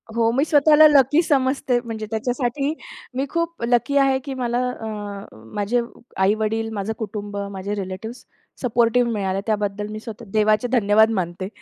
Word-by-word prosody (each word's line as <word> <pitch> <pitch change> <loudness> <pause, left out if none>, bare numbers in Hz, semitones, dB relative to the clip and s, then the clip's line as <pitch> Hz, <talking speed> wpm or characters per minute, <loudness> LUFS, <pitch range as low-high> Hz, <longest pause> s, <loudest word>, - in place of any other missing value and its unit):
हो, 230 0 +3
मी 275 - +3
स्वतःला 305 +1 +6
लकी 290 +2 +4
समजते 265 -3 +1
म्हणजे 220 -2 -5
त्याच्यासाठी 245 +5 -1 0.4
मी 270 - 0
खूप 335 -5 -3
लकी 245 +4 +2
आहे, 270 -1 +4
की 270 +1 -6
मला 245 -2 -1
अ, 225 -3 -7 0.7
माझे 215 +4 +1 0.4
आई-वडील, 220 +3 +1
माझं 205 +2 -3
कुटुंब, 205 -2 -5
माझे 195 +2 -4
रिलेटिव्हज 200 +5 -6 0.4
सपोर्टिव्ह 240 0 +2
मिळाले. 195 -3 -1
त्याबद्दल 210 -1 -1
मी 215 - -5
स्वतः 225 +1 -9
देवाचे 215 +2 +3
धन्यवाद 220 -2 +4
मानते. 175 +1 -4
230 Hz, 145 wpm, -22 LUFS, 210-260 Hz, 0.7 s, स्वतःला